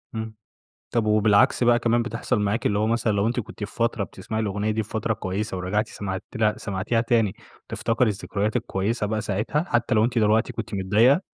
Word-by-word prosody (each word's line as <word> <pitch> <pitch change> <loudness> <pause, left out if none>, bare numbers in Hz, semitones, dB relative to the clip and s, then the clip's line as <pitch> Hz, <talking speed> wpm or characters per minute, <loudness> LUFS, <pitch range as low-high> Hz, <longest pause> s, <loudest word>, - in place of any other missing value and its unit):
إمم. 110 0 -5 0.6
طب 115 -2 +1
وبالعكس 105 +2 +4
بقى 120 0 +5
كمان 120 0 +2
بتحصل 115 -2 -1
معاكِ، 105 +3 0
اللي 100 0 +1
هو 110 - +1
مثلًا، 115 -1 +1
لو 100 +1 +1
أنتِ 120 +2 0
كنتِ 105 -1 -7
في 105 - -8
فترة 115 -3 0
بتسمعي 110 +4 -5
الأغنية 105 0 -1
دي 110 +1 0
في 105 - -12
فترة 110 0 -1
كويسة 100 -1 -3
ورجعتِ 100 +5 -1
سمعتيله 105 +3 -2
سمعتيها 105 +3 -1
تاني 115 -4 +2 0.3
وتفتكري 115 +1 0
الذكريات 105 +1 -2
الكويِّسة 105 +3 -1
بقى 110 +1 -1
ساعتها، 105 +10 -1
حتى 120 +1 +1
لو 110 0 +4
أنتِ 120 0 0
دلوقتي 110 +3 +2
كنتِ 110 -2 -5
متضايقة؟ 105 - +4
110 Hz, 190 wpm, -24 LUFS, 100-115 Hz, 0.6 s, بقى